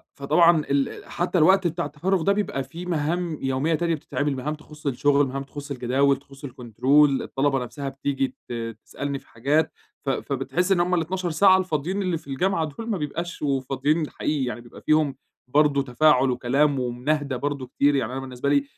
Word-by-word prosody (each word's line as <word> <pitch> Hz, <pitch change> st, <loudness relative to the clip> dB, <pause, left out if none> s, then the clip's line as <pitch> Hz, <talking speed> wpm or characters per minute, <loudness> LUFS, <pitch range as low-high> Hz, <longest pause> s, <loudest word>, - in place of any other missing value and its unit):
فطبعًا 155 Hz, +3 st, +4 dB
ال 140 Hz, -1 st, -1 dB
حتى 180 Hz, +1 st, -1 dB
الوقت 190 Hz, +3 st, +5 dB
بتاع 170 Hz, +1 st, -2 dB
التفرغ 170 Hz, +5 st, -1 dB
ده 200 Hz, +4 st, +3 dB
بيبقى 200 Hz, -9 st, -1 dB
فيه 165 Hz, +7 st, -9 dB
مهام 170 Hz, 0 st, -1 dB
يومية 135 Hz, +5 st, 0 dB
تانية 170 Hz, 0 st, 0 dB
بتتعمل، 145 Hz, -1 st, -2 dB
مهام 150 Hz, +4 st, -3 dB
تخص 150 Hz, -1 st, -11 dB
الشغل، 140 Hz, +2 st, +3 dB
مهام 135 Hz, +1 st, -4 dB
تخص 145 Hz, +1 st, -9 dB
الجداول 135 Hz, +2 st, +2 dB
تخص 140 Hz, 0 st, -17 dB
الكنترول 135 Hz, +3 st, +2 dB
الطلبة 135 Hz, 0 st, 0 dB
نفسها 140 Hz, +3 st, -5 dB
بتيجي 135 Hz, -1 st, -2 dB
ت -, -, -4 dB, 0.3 s
تسألني 140 Hz, -1 st, -4 dB
في -, -, -26 dB
حاجات، 140 Hz, +7 st, +1 dB, 0.3 s
ف -, -, 0 dB
فبتحس 140 Hz, +8 st, -1 dB
إن 180 Hz, -, +4 dB
هُم 180 Hz, +1 st, +1 dB
ال12 175 Hz, +2 st, -1 dB
ساعة 190 Hz, +3 st, +6 dB
الفاضيين 185 Hz, +2 st, -1 dB
اللي 180 Hz, -3 st, 0 dB
في 145 Hz, -, -15 dB
الجامعة 165 Hz, +4 st, 0 dB
دول، 225 Hz, +11 st, -7 dB
ما 210 Hz, -, 0 dB
بيبقاش 170 Hz, +3 st, -4 dB
وفاضيين 145 Hz, +3 st, 0 dB
حقيقي، 145 Hz, -4 st, -1 dB
يعني 120 Hz, -1 st, -4 dB
بيبقى 120 Hz, -, -14 dB
فيهم 155 Hz, -3 st, +2 dB, 0.3 s
برضو 145 Hz, +1 st, +3 dB
تفاعل 135 Hz, 0 st, +3 dB
وكلام 135 Hz, +3 st, +1 dB
ومناهِدة 130 Hz, +3 st, -1 dB
برضو 140 Hz, -2 st, -3 dB
كتير، 140 Hz, +3 st, +2 dB
يعني 125 Hz, -3 st, 0 dB
أنا 135 Hz, -, -3 dB
بالنسبة 130 Hz, +1 st, -3 dB
لي 140 Hz, -1 st, +3 dB
145 Hz, 180 wpm, -24 LUFS, 135-165 Hz, 0.3 s, ساعة